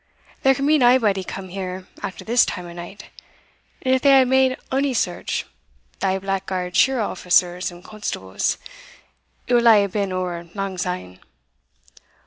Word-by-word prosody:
There 270 0 +4
can 275 - -2
be 305 +1 +4
naebody 235 -6 +4
come 190 0 -7
here 185 0 -6
after 200 -1 -6
this 235 +2 +4
time 180 - -4
o' 170 - -9
night; 175 +4 -10 0.7
and 260 - +2
if 260 - +2
they 280 - +4
hae 270 -1 +7
made 260 0 +3
ony 270 0 +1
search, - - -2 0.5
thae 190 -1 +1
blackguard 190 -2 -3
shirra' 260 -5 +3
officers 180 -1 +1
and 175 0 -13
constables, 185 - -3 0.9
it 245 - -1
will 235 -1 +5
hae 205 -2 +5
been 200 0 -2
ower 175 -2 -4
lang 195 -2 -3
syne. 180 - -4
195 Hz, 150 wpm, -22 LUFS, 180-250 Hz, 0.9 s, hae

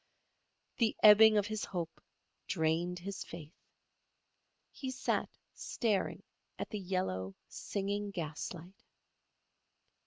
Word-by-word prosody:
The 225 -2 +2
ebbing 215 0 +9
of 205 - +3
his 215 0 -3
hope 170 -3 -4 0.5
drained 170 +1 0
his 195 +2 -5
faith. 160 -1 -10 1.2
He 265 - -5
sat 260 0 -1 0.2
staring 215 -5 -1 0.3
at - - -5
the 210 - -3
yellow, 175 - -2
singing 205 +1 -3
gaslight. 175 +1 -6
190 Hz, 95 wpm, -33 LUFS, 170-210 Hz, 1.2 s, ebbing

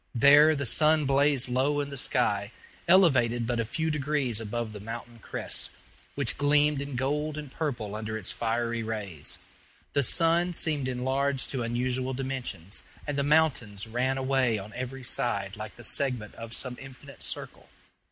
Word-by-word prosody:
There 145 +5 +7
the 140 -1 -2
sun 155 +4 +3
blazed 140 -1 +2
low 135 +4 +1
in 145 -1 -3
the - - -5
sky, 105 -5 +1 0.4
elevated 130 -10 +4
but 120 0 -1
a 115 - 0
few 160 +8 -1
degrees 140 -6 0
above 115 0 -4
the 105 - -7
mountain 115 +2 -8
crests, - - -4 0.5
which 140 -5 0
gleamed 145 0 +3
in 140 -2 -5
gold 150 +4 -1
and 150 -3 -7
purple 120 -11 -3
under 110 0 -4
its 105 - -1
fiery 115 0 -1
rays. 100 -9 -4 0.6
The 140 - +3
sun 170 +6 +2
seemed 150 -5 +1
enlarged 130 +1 -1
to 130 - -2
unusual 125 +2 -1
dimensions, 125 -9 -2 0.2
and 145 - -3
the 140 - +1
mountains 140 -9 +2
ran 125 +4 -1
away 130 -3 +1
on 105 +1 -8
every 130 +1 -5
side 100 -5 0
like 105 0 -7
the 120 - -12
segment 125 -4 +2
of 115 0 -8
some 125 -2 -2
infinite 135 +1 -12
circle. - - -4
130 Hz, 160 wpm, -28 LUFS, 115-145 Hz, 0.6 s, There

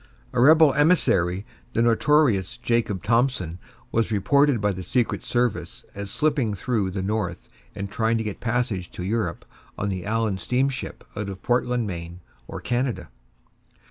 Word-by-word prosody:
A 125 - +2
rebel 155 +1 +7
emissary, 105 - +3 0.3
the 115 - +2
notorious 120 -3 +3
Jacob 115 -6 0
Thompson, 115 -7 +1 0.3
was 115 0 +1
reported 135 +6 +3
by 105 0 +1
the 95 -1 -5
secret 120 +5 -1
service 120 -3 -1
as 100 0 -6
slipping 140 -6 +1
through 105 -1 -1
the 95 0 -3
North 105 -1 -3 0.3
and 100 - -4
trying 115 +3 0
to 110 - -2
get 105 -2 -5
passage 115 -7 -1
to 90 - -6
Europe 100 -3 -2 0.3
on 100 - -1
the 95 -2 -3
Allan 105 -2 -1
steamship 130 +5 -1
out 105 -1 -3
of 95 -1 -8
Portland, 120 -1 +1
Maine, 85 -2 -6 0.3
or - - -6
Canada. 120 0 -2
115 Hz, 150 wpm, -24 LUFS, 95-125 Hz, 0.3 s, rebel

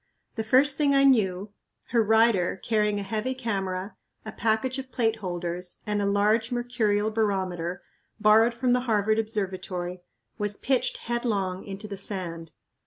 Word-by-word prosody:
The 220 - -3
first 265 +5 +4
thing 285 -2 +3
I 275 - +5
knew, 205 -6 +2 0.4
her 235 -1 +3
rider, 220 -4 +3
carrying 210 -2 +1
a - - -3
heavy 220 +6 -2
camera, 195 -5 -3 0.3
a 215 - -5
package 230 +4 0
of 260 -1 -8
plate 225 -2 0
holders, 175 -2 -4
and 210 -1 -1
a 200 - 0
large 210 +4 +2
mercurial 225 -4 0
barometer, 185 -5 -2 0.4
borrowed 220 +2 +5
from 245 0 +1
the 250 - +3
Harvard 215 0 +2
Observatory, 185 -4 -2 0.4
was 205 -1 0
pitched 265 -2 0
headlong 205 -6 -2
into 200 +1 -7
the 200 -1 -6
sand. 170 -5 -3
210 Hz, 150 wpm, -26 LUFS, 190-230 Hz, 0.4 s, I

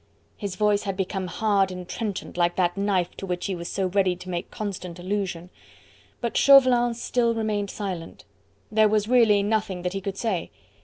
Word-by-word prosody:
His 200 -3 -5
voice 210 0 +2
had 195 -3 -4
become 190 -1 -2
hard 200 0 +1
and 180 -1 -7
trenchant 210 -2 -4
like 175 0 +1
that 175 -2 +1
knife 195 -3 0
to 195 - -6
which 180 -1 -3
he 195 - -1
was 170 -1 -5
so 195 - -1
ready 185 -1 +2
to 180 +1 -10
make 175 0 -4
constant 185 -5 -5
allusion. 180 -2 -3 0.7
But 235 -2 -2
Chauvelin 255 -4 +6
still 235 0 0
remained 210 -2 -1
silent. 185 - -6 0.5
There 215 0 +4
was 210 0 +1
really 225 -5 +4
nothing 205 -4 -1
that 180 0 -2
he 195 - -3
could 195 -1 -4
say. 205 -7 -2
195 Hz, 185 wpm, -25 LUFS, 180-215 Hz, 0.7 s, Chauvelin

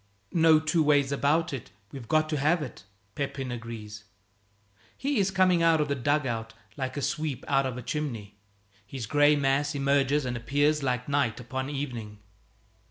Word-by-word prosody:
"No 160 -2 +6
two 155 +1 +1
ways 145 -2 +3
about 145 +4 +1
it, 130 - -6 0.2
we've 130 -5 -9
got 155 0 +2
to 155 - -1
have 155 +3 +2
it," 125 -8 -9 0.3
Pepin 135 -1 -4
agrees. 110 -3 -7 0.9
He 275 -2 0
is 195 -1 +2
coming 185 -2 +3
out 165 -1 +4
of 150 -1 0
a - - +4
dug 145 +3 0
out 115 -2 -4 0.2
like 130 0 -4
a 140 - -2
sweep 145 -1 -2
out 135 -1 +2
of 125 -1 -5
a 125 - -6
chimney. 115 -9 -4 0.4
His 115 +4 -6
gray 145 +5 +4
mass 145 +1 +1
emerges 140 0 +2
and 125 -1 -2
appears, 145 +5 +1
like 125 -2 -1
night 140 -6 0
upon 130 +3 -4
evening. 120 -7 -5
140 Hz, 170 wpm, -27 LUFS, 125-150 Hz, 0.9 s, No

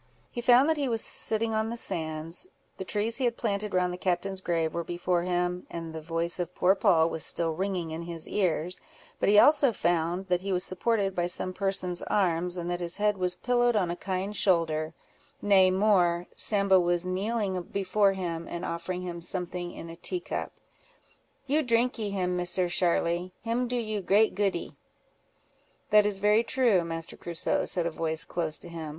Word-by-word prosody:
He 240 - -4
found 245 +3 +5
that 320 -1 +2
he 280 -3 -1
was 225 -2 0
sitting 225 0 0
on 220 0 0
the 235 - -4
sands, 160 - -2 0.3
the - - -4
trees 210 +4 +1
he 265 - 0
had 235 -1 0
planted 205 -3 -2
round 180 -1 +1
the 180 - -7
captain's 190 +1 -1
grave 165 -3 -1
were 170 - -2
before 175 +1 -1
him, 180 0 -2
and 165 -1 -6
the 160 - -6
voice 165 +2 -1
of 175 0 -4
poor 185 +2 +4
Poll 165 -4 +3
was 160 -1 -3
still 165 -1 +2
ringing 180 -1 -3
in 160 +1 -5
his 170 -1 -6
ears; 180 -3 -1 0.4
but - - +2
he 205 - +5
also 285 +2 +6
found 175 -1 0
that 180 -1 +1
he 195 +1 -3
was 180 -1 +1
supported 195 +1 0
by 175 -1 0
some 185 +1 -1
person's 185 -2 -2
arms, 180 -2 0
and 175 -1 -4
that 175 - -2
his 170 -1 -1
head 210 -1 +1
was 180 -1 +1
pillowed 240 +3 +1
on 185 -5 +1
a - - -3
kind 190 +2 -3
shoulder; 165 -5 +1 0.4
nay 195 -2 +5
more, 185 -3 +2
Sambo 200 -3 +3
was 175 0 +1
kneeling 195 0 -1
before 195 +2 +1
him, 170 -3 -4
and 170 - -5
offering 175 +2 -4
him 170 -1 -6
something 175 0 -4
in 165 - -9
a - - -9
tea 355 - -3
cup. - - -5 0.9
"You 290 +3 +2
drinkee 235 -4 0
him, 180 -2 -1
Misser 180 0 +1
Sharly; 175 0 0
him 235 +2 -1
do 245 - -3
you 215 -3 -2
great 205 +4 +3
goodee." 195 -4 -1 1.2
"That 210 0 +6
is 205 -2 -1
very 210 +3 +3
true, 235 -8 +2
Master 165 0 -5
Crusoe," 170 -2 -1
said 175 -2 0
a 170 - -1
voice 160 0 -1
close 160 -3 -1
to - - -8
him. 165 -2 -6
185 Hz, 190 wpm, -28 LUFS, 170-210 Hz, 1.2 s, also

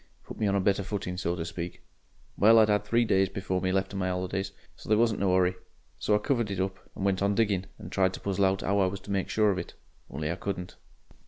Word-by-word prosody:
Put - - -10
me 110 - +1
on 100 - +2
a - - +3
better 100 +1 +2
footing, 95 -2 -4
so 90 -1 -1
to 80 -2 -4
speak. 85 0 -6 0.5
Well, 110 +3 +6
I 110 - +8
'ad 105 -1 +2
three 115 +3 +2
days 95 -3 +3
before 95 -1 -2
me 95 - 0
left 95 +1 0
of 100 - -3
my 95 -1 0
'olidays, 95 +1 -2 0.3
so - - -13
there 110 - +5
wasn't 115 -2 +2
no 95 -2 +2
hurry, 90 0 +3 0.5
so 105 - +2
I - - +5
covered 120 0 0
it 100 -2 -3
up 95 0 -2 0.2
and 95 - -3
went 95 -1 +1
on 100 0 +2
digging, 100 -4 +1
and - - -10
tried 95 -1 +2
to - - -9
puzzle 100 0 +1
out 95 0 +1
'ow 100 +1 +1
I 95 - +4
was 95 +1 -4
to 100 - -8
make 95 -1 -1
sure 105 -1 +3
of 95 - -1
it. 85 - -8 0.3
Only 75 +3 -3
I 85 - -3
couldn't. 90 -1 -5
95 Hz, 265 wpm, -28 LUFS, 95-100 Hz, 0.5 s, I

